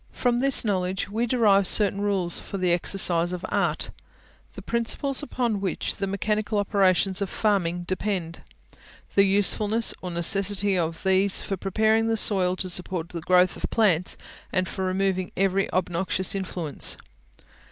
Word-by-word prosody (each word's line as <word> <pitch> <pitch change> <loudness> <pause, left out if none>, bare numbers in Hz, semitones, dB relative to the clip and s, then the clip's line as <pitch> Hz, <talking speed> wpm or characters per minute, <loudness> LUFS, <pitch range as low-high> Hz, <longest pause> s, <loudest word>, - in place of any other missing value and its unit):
From 240 -1 0
this 275 -2 +3
knowledge 190 -2 -1
we 230 +3 -1
derive 210 -6 +3
certain 200 -1 +3
rules 195 -4 0
for 195 - -6
the 180 -2 +1
exercise 175 -1 +1
of 180 - -5
the - - -6
ART, - - -1 0.6
the - - -8
principles 245 +4 -1
upon 240 -8 -2
which 190 -3 -3
the 195 - -2
mechanical 210 +2 -1
operations 195 -1 +2
of 195 - -2
farming 180 -5 0
depend, 185 -2 -3 0.7
the 200 - +5
usefulness 205 +3 +2
or 180 - -5
necessity 195 +3 +1
of 165 -2 -2
these 190 +1 +2
for 195 - -3
preparing 220 +4 +1
the 225 0 +1
soil 185 -4 +3
to 185 - -4
support 180 -1 -3
the 170 -2 -6
growth 180 +2 +3
of - - -5
plants, 180 -6 +1 0.3
and 185 -1 0
for 190 - -4
removing 185 0 -1
every 195 +1 +1
obnoxious 185 +1 -1
influence. 180 -6 -1
195 Hz, 150 wpm, -25 LUFS, 180-205 Hz, 0.7 s, the